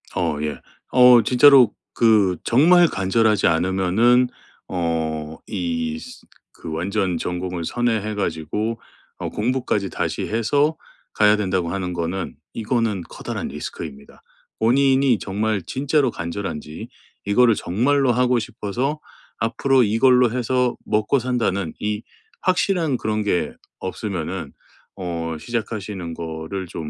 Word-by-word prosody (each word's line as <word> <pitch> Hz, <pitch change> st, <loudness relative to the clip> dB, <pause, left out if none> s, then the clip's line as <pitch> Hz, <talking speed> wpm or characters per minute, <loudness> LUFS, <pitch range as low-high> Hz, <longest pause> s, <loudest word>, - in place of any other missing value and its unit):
어 80 Hz, -4 st, 0 dB
예. 75 Hz, -1 st, -4 dB, 0.3 s
어 125 Hz, -1 st, +7 dB
'진짜로 130 Hz, -2 st, +6 dB, 0.2 s
그 105 Hz, -6 st, +3 dB
정말 170 Hz, +8 st, +5 dB
간절하지 105 Hz, -, +2 dB
않으면은 95 Hz, +9 st, +3 dB, 0.4 s
어 80 Hz, -3 st, -2 dB
이 245 Hz, -1 st, -2 dB
스 250 Hz, 0 st, -12 dB, 0.3 s
그 80 Hz, -, -8 dB
완전 90 Hz, +2 st, -1 dB
전공을 90 Hz, 0 st, -4 dB
선회해 110 Hz, -1 st, -1 dB
가지고 105 Hz, +5 st, -2 dB, 0.4 s
어 -, -, -4 dB
공부까지 115 Hz, -4 st, -1 dB
다시 -, -, -3 dB
해서 145 Hz, +8 st, +1 dB, 0.4 s
가야 105 Hz, 0 st, +5 dB
된다.'고 95 Hz, -4 st, -1 dB
하는 90 Hz, 0 st, -3 dB
거는 85 Hz, +2 st, -3 dB, 0.2 s
이거는 115 Hz, -3 st, -1 dB
커다란 -, -, -5 dB
리스크입니다. 70 Hz, -1 st, -8 dB, 0.4 s
본인이 130 Hz, +1 st, +3 dB
정말 105 Hz, 0 st, -1 dB
진짜로 135 Hz, -, 0 dB
간절한지 85 Hz, -3 st, -5 dB, 0.4 s
이거를 115 Hz, +2 st, +4 dB
정말로 125 Hz, +8 st, +1 dB
하고 125 Hz, 0 st, +2 dB
싶어서 125 Hz, +8 st, -3 dB, 0.4 s
'앞으로 125 Hz, +3 st, +2 dB
이걸로 125 Hz, +2 st, +4 dB
해서 125 Hz, 0 st, 0 dB
먹고 110 Hz, +5 st, +1 dB
산다.'는 110 Hz, -8 st, -1 dB
이 105 Hz, 0 st, -2 dB, 0.4 s
확실한 175 Hz, -5 st, +1 dB
그런 110 Hz, -2 st, -1 dB
게 95 Hz, -4 st, 0 dB, 0.3 s
없으면은 95 Hz, -4 st, -4 dB, 0.4 s
어 85 Hz, -3 st, -4 dB
시작하시는 105 Hz, -5 st, -4 dB
거를 80 Hz, +3 st, -5 dB
좀 80 Hz, -2 st, -6 dB
105 Hz, 265 characters per minute, -22 LUFS, 90-125 Hz, 0.4 s, 어